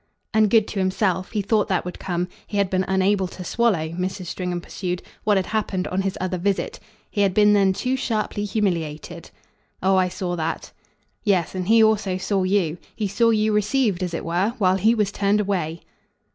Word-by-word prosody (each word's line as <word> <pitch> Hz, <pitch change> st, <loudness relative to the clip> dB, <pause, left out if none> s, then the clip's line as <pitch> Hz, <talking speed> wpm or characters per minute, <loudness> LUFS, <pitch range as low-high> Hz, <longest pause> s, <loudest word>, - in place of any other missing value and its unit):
"And 215 Hz, -1 st, +4 dB
good 220 Hz, 0 st, +4 dB
to 200 Hz, -, -3 dB
himself 185 Hz, -1 st, 0 dB
he 210 Hz, -2 st, 0 dB
thought 210 Hz, +1 st, +2 dB
that 185 Hz, -2 st, 0 dB
would 180 Hz, -, -6 dB
come. 175 Hz, -1 st, -2 dB, 0.2 s
He 205 Hz, -, -4 dB
had 200 Hz, -2 st, +1 dB
been 185 Hz, 0 st, +2 dB
unable 190 Hz, 0 st, +2 dB
to 180 Hz, 0 st, -9 dB
swallow," 195 Hz, -7 st, +1 dB
Mrs. 185 Hz, +2 st, -4 dB
Stringham 180 Hz, 0 st, -3 dB
pursued, 180 Hz, 0 st, -4 dB, 0.2 s
"what 210 Hz, -2 st, +4 dB
had 190 Hz, -, 0 dB
happened 195 Hz, -3 st, -1 dB
on 185 Hz, +1 st, 0 dB
his 195 Hz, -1 st, -2 dB
other 185 Hz, 0 st, -2 dB
visit. 195 Hz, +2 st, -1 dB, 0.3 s
He 205 Hz, -, 0 dB
had 195 Hz, -2 st, +2 dB
been 210 Hz, 0 st, +6 dB
then 195 Hz, -2 st, +4 dB
too 250 Hz, +7 st, -1 dB
sharply 215 Hz, -4 st, -2 dB
humiliated." 170 Hz, -5 st, -2 dB, 0.5 s
"Oh 190 Hz, 0 st, +4 dB
I 185 Hz, -1 st, +3 dB
saw 180 Hz, -1 st, -3 dB
that." 160 Hz, 0 st, -3 dB, 0.5 s
"Yes, 185 Hz, -5 st, +1 dB
and 185 Hz, -1 st, -3 dB
he 225 Hz, +1 st, +6 dB
also 210 Hz, -4 st, +2 dB
saw 195 Hz, +1 st, 0 dB
you. 185 Hz, -3 st, +1 dB, 0.2 s
He 210 Hz, -, -1 dB
saw 230 Hz, +4 st, +2 dB
you 215 Hz, -1 st, +2 dB
received, 210 Hz, -2 st, +1 dB
as 180 Hz, -2 st, -2 dB
it -, -, -4 dB
were, 185 Hz, +8 st, 0 dB
while 190 Hz, -3 st, +3 dB
he 220 Hz, +4 st, +3 dB
was 210 Hz, -3 st, +1 dB
turned 200 Hz, +1 st, +1 dB
away." 175 Hz, -5 st, -1 dB
190 Hz, 200 wpm, -23 LUFS, 180-210 Hz, 0.5 s, been